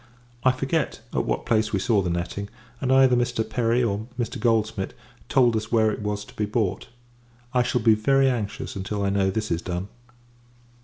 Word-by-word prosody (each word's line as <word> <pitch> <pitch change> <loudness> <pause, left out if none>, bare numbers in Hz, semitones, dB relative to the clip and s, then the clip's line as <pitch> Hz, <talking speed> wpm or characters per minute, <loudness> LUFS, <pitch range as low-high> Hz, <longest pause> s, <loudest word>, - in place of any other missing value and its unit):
I 130 - +6
forget, 135 +5 -1
at - - 0
what - - -2
place 110 -1 +1
we 100 - +1
saw 100 +2 +2
the 90 - -2
netting; 90 +4 -3 0.3
and 130 - 0
either 130 -1 +6
Mr. 120 -2 0
Perry, 120 0 +1
or 110 0 -1
Mr. 120 -3 -3
Goldsmid, 110 -4 0 0.3
told 125 -4 +4
us 110 0 -3
where 110 -2 +4
it 105 - -5
was 105 0 -3
to - - -16
be 105 - 0
bought. 105 -3 -1 0.7
I 125 - +4
shall 120 0 0
be 110 0 +6
very 135 +6 +3
anxious 115 -6 -2
until 100 +1 -3
I 100 - +1
know 100 -1 +2
this 110 +1 -2
is 85 0 0
done. 90 +2 -4
110 Hz, 195 wpm, -25 LUFS, 100-120 Hz, 0.7 s, I